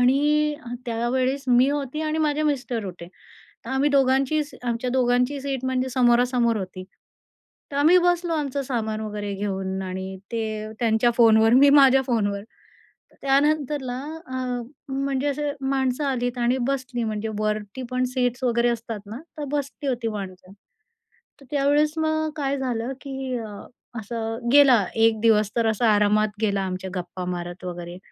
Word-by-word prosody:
आणि 295 +4 +3
अ 240 - -5
त्यावेळेस 255 +4 -1
मी 250 +2 +5
होती 290 0 -3
आणि 310 0 -1
माझे 305 -1 +1
मिस्टर 255 -7 -1
होते. 175 -2 -8 0.6
तर - - -7
आम्ही 270 +2 +2
दोघांची 275 +2 +2
स 290 - -14
आमच्या 240 +1 -2
दोघांची 250 +2 +1
सीट 270 -2 -3
म्हणजे 260 0 0
समोरासमोर 245 -1 +3
होती. 185 -1 -6 0.9
तर - - -5
आम्ही 315 +5 +6
बसलो 350 -1 +1
आमचं 285 -3 -1
सामान 220 -4 -2
वगैरे 210 -1 -4
घेऊन 190 -1 -3
आणि 190 +1 -5
ते 215 -1 -3
त्यांच्या 230 0 +3
फोनवर 225 0 +6
मी 280 +2 +7
माझ्या 270 -2 +6
फोनवर. 205 -5 0 0.7
तर - - -24
त्यानंतरला 280 -2 +1 0.4
अ, 250 -1 -2 0.3
म्हणजे 275 0 -1
असे 290 0 -1 0.2
माणसं 265 0 0
आलीत 245 -2 -1
आणि 240 +2 +2
बसली 260 -3 -2
म्हणजे 220 0 -3
वरती 215 +3 -2
पण 255 0 0
सीट्स 250 0 -1
वगैरे 240 -1 +2
असतात 230 -2 -4
ना, 220 +4 -7 0.2
तर 295 - -4
बसली 285 0 -3
होती 240 -3 -2
माणसं. 185 -3 -7 0.9
तर - - -15
त्यावेळेस 290 +1 +3
मग 315 0 0
काय 280 -2 -1
झालं 250 -1 -2
की 265 -2 -4
अ, 220 -2 -7 0.5
असं 225 +2 -4
गेला 265 -7 +7
एक 225 -1 +3
दिवस 215 -2 +3
तर 230 -1 +2
असा 220 +1 +1
आरामात 210 +1 +3
गेला 200 -2 +1
आमच्या 185 0 -4
गप्पा 180 +1 -5
मारत 175 0 -5
वगैरे. 175 0 -6
245 Hz, 155 wpm, -24 LUFS, 215-275 Hz, 0.9 s, मी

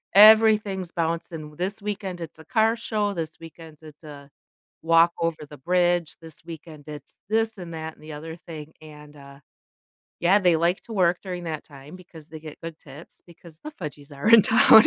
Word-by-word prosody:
everything's 210 -3 +6
bouncing, 165 -2 -4
this 190 +4 -2
weekend, 195 -3 -4
it's 160 -1 -8
a 160 - -13
car 225 -1 +2
show, 210 -3 -2
this 160 -2 -5
weekend, 165 -1 -12
it's 155 0 -14
a 145 -2 -11 0.5
walk 165 +1 +5
over 165 -1 0
the 150 - -11
bridge, 175 0 +1
this 160 -2 -13
weekend, 160 -3 -10
it's 145 -2 -10
this, 225 0 0
and 170 -2 -8
that, 160 0 -6
and - - -23
the 155 -1 -9
other 160 +2 -7
thing, 155 -1 -9
and, 150 -1 -13
uh 140 -1 -14 0.8
yeah, 190 +4 +5
they 180 -3 +4
like 170 +3 +1
to 230 - -9
work 180 -3 +3
during 180 -2 -5
that 155 -2 -4
time 145 +3 -13
because 165 -4 -14
they 155 -1 -9
get 155 -1 -10
good 165 -1 -7
tips 145 +2 -14
because 170 -1 -16
the 305 - -5
"fudgies" 145 - -9
are 200 +11 0
in 230 -2 +9
town. 220 0 +7
165 Hz, 190 wpm, -24 LUFS, 155-190 Hz, 0.8 s, in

